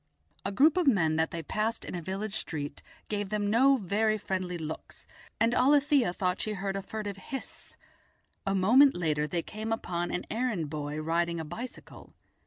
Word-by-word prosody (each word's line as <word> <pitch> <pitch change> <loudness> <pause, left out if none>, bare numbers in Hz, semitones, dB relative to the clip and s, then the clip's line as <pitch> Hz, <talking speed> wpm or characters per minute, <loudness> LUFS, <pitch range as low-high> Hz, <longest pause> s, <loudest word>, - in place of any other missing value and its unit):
A 195 - -2
group 290 - +4
of 355 -4 +2
men 170 -11 +4
that 160 0 +2
they 165 -1 -5
passed 220 +7 -2
in - - -6
a 175 - -3
village 195 +4 -4
street 145 -8 -3 0.3
gave 205 -2 -2
them 205 -1 0
no 265 +4 +5
very 215 +1 +1
friendly 185 -3 -3
looks, 160 -1 -7 0.3
and 230 +2 +3
Alethia 280 -3 +4
thought 180 +1 -1
she 215 - -2
heard 195 -1 -3
a 195 - -2
furtive 205 -1 -5
hiss; 265 +7 -8 0.7
a 195 0 0
moment 245 +9 +6
later 150 -3 0
they 170 +1 -2
came 220 +1 -5
upon 175 -6 -2
an - - -3
errand 215 - -1
boy 150 0 -3
riding 170 +2 0
a 160 - -4
bicycle. 230 +11 -9
195 Hz, 180 wpm, -29 LUFS, 170-225 Hz, 0.7 s, moment